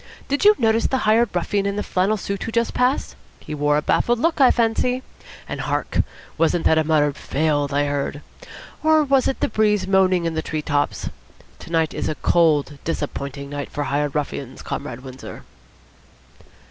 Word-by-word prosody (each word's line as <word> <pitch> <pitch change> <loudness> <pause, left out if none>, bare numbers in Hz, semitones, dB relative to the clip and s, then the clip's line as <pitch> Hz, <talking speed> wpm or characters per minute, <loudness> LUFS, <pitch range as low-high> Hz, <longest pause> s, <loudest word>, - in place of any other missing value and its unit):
Did 285 +1 0
you 420 +1 +8
notice 225 -1 +2
the 265 - 0
hired 220 +2 +4
ruffian 200 +3 0
in 200 - -2
the 210 - -2
flannel 195 +4 +1
suit 200 0 -4
who 225 - -4
just 235 0 0
passed? 250 +3 0 0.2
He 155 - -8
wore 145 0 +2
a 150 - -1
baffled 240 +8 +2
look, 320 +4 +1
I 260 - +8
fancy. 250 +2 +1 0.4
And - - -4
hark! - - -2 0.4
Wasn't 165 +1 +2
that 160 - +4
a - - +2
muttered 150 -2 +2
'Failed!' 145 -1 0
I 145 +1 +1
heard? 145 +1 -3 0.6
Or 315 0 +4
was 275 -2 +2
it 270 - -2
the - - +2
breeze 210 -3 +1
moaning 185 -2 +3
in 165 - -1
the 160 - -1
tree 155 -1 -4
tops? 145 -2 -1 0.5
To - - -11
night 160 -2 +1
is - - -2
a 155 - -2
cold, 150 -4 +2
disappointing 140 -3 -4
night 145 0 -4
for 145 - -3
Hired 145 0 -1
Ruffians, 140 -3 -4
Comrade 130 -4 -5
Windsor." 130 -1 -9
165 Hz, 185 wpm, -22 LUFS, 145-225 Hz, 0.6 s, you